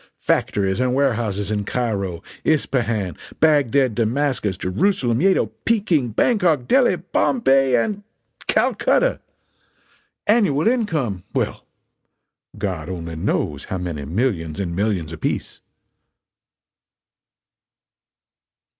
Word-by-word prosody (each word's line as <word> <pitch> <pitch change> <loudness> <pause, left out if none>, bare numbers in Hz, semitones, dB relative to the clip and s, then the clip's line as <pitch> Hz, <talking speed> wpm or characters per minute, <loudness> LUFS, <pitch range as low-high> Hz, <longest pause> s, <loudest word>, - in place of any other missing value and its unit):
Factories 95 +2 0
and 125 0 +1
warehouses 110 -7 0
in 105 -1 -1
Cairo, 100 -7 -2 0.2
Ispahan, 115 - 0 0.2
Bagdad, 140 -5 +3
Damascus, 120 -3 0
Jerusalem, 120 - +1
Yedo, 190 +1 +2
Peking, 180 - +1
Bangkok, 160 - +2
Delhi, 265 -2 +4
Bombay 135 - +2
and 200 - 0 0.5
Calcutta! - - +2 1.1
Annual 205 -8 +3
income 155 - 0
well, - - -2 0.9
God 95 -6 -3
only 85 -3 -5
knows 75 -2 -2
how 95 - -4
many 85 -5 -4
millions 85 - -1
and 85 -4 -3
millions 95 -5 -1
apiece!" 80 - -3
120 Hz, 90 wpm, -21 LUFS, 95-145 Hz, 1.1 s, Delhi